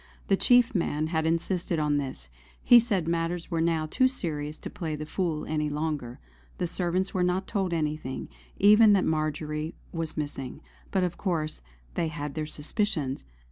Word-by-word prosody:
The 195 Hz, -, +6 dB
chief 245 Hz, +4 st, +4 dB
man 155 Hz, -5 st, 0 dB
had 160 Hz, 0 st, +1 dB
insisted 170 Hz, +1 st, 0 dB
on 150 Hz, -1 st, +2 dB
this; 130 Hz, -, -4 dB, 0.4 s
he 245 Hz, -, +9 dB
said 200 Hz, -8 st, +1 dB
matters 170 Hz, +1 st, -1 dB
were 165 Hz, -1 st, +1 dB
now 165 Hz, -1 st, +1 dB
too 255 Hz, -, +3 dB
serious 155 Hz, -, -3 dB
to -, -, -7 dB
play 160 Hz, -3 st, -3 dB
the 155 Hz, 0 st, -5 dB
fool 160 Hz, -2 st, -2 dB
any 150 Hz, -1 st, -1 dB
longer. 150 Hz, -5 st, -3 dB, 0.4 s
The -, -, -1 dB
servants 180 Hz, +2 st, -1 dB
were 185 Hz, -, 0 dB
not 180 Hz, +2 st, +1 dB
told 195 Hz, -3 st, -1 dB
anything, 150 Hz, -5 st, -2 dB, 0.3 s
even 210 Hz, +1 st, +7 dB
that 195 Hz, -, +3 dB
Marjory 155 Hz, 0 st, -1 dB, 0.2 s
was 165 Hz, -2 st, -4 dB
missing; 140 Hz, -4 st, -4 dB, 0.3 s
but 190 Hz, -2 st, +1 dB
of 180 Hz, -1 st, -2 dB
course 160 Hz, -, -1 dB, 0.3 s
they 165 Hz, -, 0 dB
had 150 Hz, -2 st, -5 dB
their 155 Hz, -1 st, -3 dB
suspicions. 150 Hz, -, -2 dB
160 Hz, 170 wpm, -28 LUFS, 150-185 Hz, 0.4 s, he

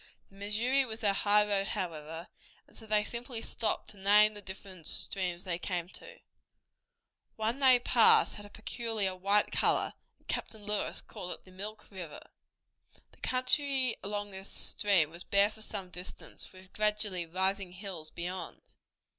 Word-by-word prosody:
The -, -, -19 dB
Missouri 225 Hz, +7 st, +2 dB
was 225 Hz, -3 st, -5 dB
their 205 Hz, -3 st, +4 dB
highroad, 205 Hz, -1 st, +3 dB
however, 165 Hz, -1 st, -4 dB, 0.4 s
and -, -, -23 dB
so 220 Hz, -, -13 dB
they 210 Hz, 0 st, +3 dB
simply 235 Hz, +1 st, -4 dB
stopped 225 Hz, -, -1 dB
to 205 Hz, -, -14 dB
name 210 Hz, +2 st, +6 dB
the 205 Hz, -, -4 dB
different 190 Hz, -3 st, -8 dB
streams 180 Hz, -2 st, -2 dB
they 180 Hz, -3 st, -2 dB
came 175 Hz, -2 st, -2 dB
to. -, -, -8 dB, 1.2 s
One 225 Hz, +4 st, 0 dB
they 260 Hz, -2 st, +7 dB
passed 240 Hz, -1 st, +6 dB
had 205 Hz, -, -6 dB
a 205 Hz, -, -11 dB
peculiar 220 Hz, -3 st, -2 dB
white 200 Hz, +3 st, +2 dB
color, -, -, +2 dB, 0.2 s
and -, -, -34 dB
Captain 220 Hz, -2 st, -3 dB
Lewis 210 Hz, 0 st, -1 dB
called 180 Hz, -, -6 dB
it -, -, -14 dB
the 185 Hz, -, -15 dB
Milk 205 Hz, +4 st, -6 dB
River. 180 Hz, -6 st, -7 dB, 0.9 s
The -, -, -22 dB
country 255 Hz, 0 st, +2 dB
along 205 Hz, 0 st, -3 dB
this 190 Hz, +1 st, -7 dB
stream 185 Hz, -7 st, +2 dB
was 170 Hz, +1 st, -6 dB
bare 200 Hz, +1 st, +4 dB
for 220 Hz, -, -12 dB
some 195 Hz, -4 st, -3 dB
distance, 180 Hz, +1 st, -6 dB
with 185 Hz, 0 st, -15 dB
gradually 210 Hz, -4 st, +1 dB
rising 190 Hz, +1 st, 0 dB
hills 180 Hz, -5 st, -5 dB
beyond. 175 Hz, 0 st, -5 dB
200 Hz, 155 wpm, -32 LUFS, 185-215 Hz, 1.2 s, they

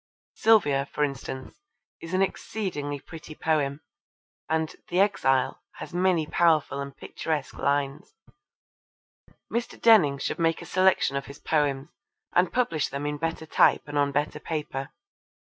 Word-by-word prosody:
Sylvia, 145 Hz, -12 st, +3 dB
for 150 Hz, -, 0 dB
instance, 135 Hz, -, -5 dB, 0.4 s
is 165 Hz, +2 st, -4 dB
an 190 Hz, -, +4 dB
exceedingly 155 Hz, -8 st, -3 dB
pretty 160 Hz, 0 st, -11 dB
poem, 150 Hz, -3 st, 0 dB, 0.7 s
and 160 Hz, 0 st, 0 dB
The 175 Hz, -, +1 dB
Exile 135 Hz, -10 st, +2 dB
has -, -, -9 dB
many 180 Hz, -3 st, +2 dB
powerful 155 Hz, -4 st, +2 dB
and 140 Hz, 0 st, -7 dB
picturesque 155 Hz, -4 st, -3 dB
lines. 140 Hz, -, -1 dB, 1.4 s
Mr. 235 Hz, 0 st, -3 dB
Denning 190 Hz, -12 st, +6 dB
should 140 Hz, -, -3 dB
make 165 Hz, -1 st, +2 dB
a -, -, -9 dB
selection 185 Hz, -6 st, +2 dB
of 140 Hz, -, -5 dB
his 140 Hz, -, -10 dB
poems 145 Hz, -2 st, 0 dB, 0.4 s
and 180 Hz, 0 st, +3 dB
publish 165 Hz, -, 0 dB
them 140 Hz, +1 st, -4 dB
in 145 Hz, 0 st, -2 dB
better 165 Hz, 0 st, -3 dB
type -, -, +4 dB
and 145 Hz, -, -7 dB
on 145 Hz, -1 st, +2 dB
better 145 Hz, +1 st, -1 dB
paper. 150 Hz, -4 st, -4 dB
150 Hz, 140 wpm, -26 LUFS, 140-175 Hz, 1.4 s, Denning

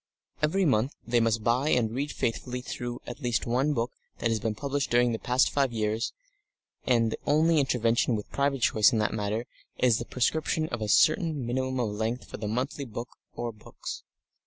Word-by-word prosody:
Every 180 Hz, +6 st, +2 dB
month 130 Hz, -1 st, +2 dB
they 120 Hz, 0 st, +2 dB
must 115 Hz, -1 st, +1 dB
buy 125 Hz, +6 st, +2 dB
and 115 Hz, -5 st, +2 dB
read 140 Hz, +4 st, -2 dB
faithfully 125 Hz, +2 st, -2 dB
through 120 Hz, -1 st, -5 dB
at 120 Hz, -, -7 dB
least 120 Hz, -6 st, 0 dB
one 130 Hz, +5 st, +1 dB
book 115 Hz, 0 st, -1 dB, 0.3 s
that 115 Hz, -, 0 dB
has 110 Hz, -, +1 dB
been 110 Hz, 0 st, -2 dB
published 140 Hz, +2 st, -2 dB
during 120 Hz, 0 st, +4 dB
the 115 Hz, -, -2 dB
past 125 Hz, +2 st, +2 dB
five 135 Hz, -3 st, +1 dB
years, 110 Hz, 0 st, -1 dB, 0.8 s
and 115 Hz, -3 st, +3 dB
the -, -, -4 dB
only 155 Hz, +2 st, +4 dB
intervention 120 Hz, -3 st, +2 dB
with 105 Hz, -, -6 dB
private 140 Hz, -2 st, 0 dB
choice 105 Hz, -2 st, +5 dB
in 115 Hz, -, +1 dB
that 105 Hz, -1 st, +1 dB
matter 110 Hz, +2 st, -2 dB, 0.3 s
is 120 Hz, -3 st, +3 dB
the 120 Hz, -, -4 dB
prescription 155 Hz, +5 st, 0 dB
of 120 Hz, -2 st, -4 dB
a 105 Hz, -, -1 dB
certain 155 Hz, -, +3 dB
minimum 130 Hz, +2 st, -1 dB
of 115 Hz, -4 st, 0 dB
length 110 Hz, +4 st, -2 dB
for -, -, -7 dB
the 105 Hz, -, -4 dB
monthly 130 Hz, +6 st, -2 dB
book 120 Hz, 0 st, -6 dB, 0.3 s
or 120 Hz, 0 st, -3 dB
books. 105 Hz, -1 st, -8 dB
120 Hz, 195 wpm, -28 LUFS, 115-135 Hz, 0.8 s, choice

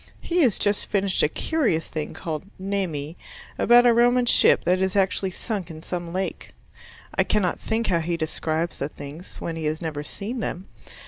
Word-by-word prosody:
He 350 Hz, +1 st, 0 dB
has 245 Hz, -9 st, +3 dB
just 205 Hz, 0 st, 0 dB
finished 195 Hz, -2 st, +1 dB
a 150 Hz, -, +4 dB
curious 230 Hz, -, 0 dB
thing 155 Hz, -1 st, -4 dB
called 160 Hz, +1 st, -4 dB
"Nemi" 180 Hz, -6 st, -3 dB, 0.4 s
about 240 Hz, +1 st, +6 dB
a 240 Hz, -, +6 dB
Roman 245 Hz, +1 st, +4 dB
ship -, -, +5 dB
that 185 Hz, +1 st, +2 dB
is 190 Hz, 0 st, 0 dB
actually 195 Hz, 0 st, +2 dB
sunk 195 Hz, 0 st, -4 dB
in 160 Hz, -1 st, -9 dB
some 175 Hz, -2 st, -4 dB
lake. 185 Hz, +2 st, -4 dB, 0.6 s
I -, -, +3 dB
cannot 195 Hz, -5 st, 0 dB
think 225 Hz, +1 st, -1 dB
how 170 Hz, -5 st, +2 dB
he 170 Hz, +1 st, -1 dB
describes 160 Hz, +1 st, -2 dB
the 140 Hz, -, -2 dB
things, 145 Hz, +4 st, -10 dB
when 165 Hz, -, -4 dB
he 160 Hz, -1 st, -4 dB
has 155 Hz, +1 st, -1 dB
never 155 Hz, -4 st, -4 dB
seen 215 Hz, +10 st, -5 dB
them. 190 Hz, -3 st, -4 dB
185 Hz, 185 wpm, -24 LUFS, 160-210 Hz, 0.6 s, about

